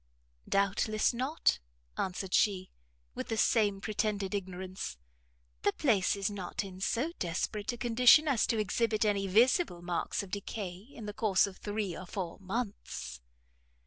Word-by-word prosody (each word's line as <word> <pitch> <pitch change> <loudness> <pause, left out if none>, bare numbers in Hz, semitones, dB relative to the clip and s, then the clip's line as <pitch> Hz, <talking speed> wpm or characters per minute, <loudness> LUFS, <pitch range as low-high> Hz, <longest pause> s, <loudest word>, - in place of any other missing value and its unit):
"Doubtless, 205 +3 +2
not," 260 +7 +1 0.4
answered 185 0 -3
she, 190 -3 +2 0.4
with - - -5
the 225 - -2
same 210 -3 +3
pretended 210 -2 -1
ignorance, 185 - -4 0.6
"the - - +2
place 215 -11 +2
is 200 -1 -1
not 205 -1 -3
in 190 -2 -9
so 250 +11 0
desperate 200 +6 -2
a 240 - -7
condition 250 +5 +6
as 270 -6 +2
to 225 - +1
exhibit 215 +2 +1
any 200 -2 +1
visible 225 - +3
marks 175 +3 -1
of 190 - -11
decay 200 -2 -4 0.2
in 225 - -9
the 210 - -5
course 205 -3 +3
of 195 -2 -8
three 205 -4 -3
or 185 - -8
four 180 -3 -5
months." 190 - -5
205 Hz, 145 wpm, -31 LUFS, 185-225 Hz, 0.6 s, condition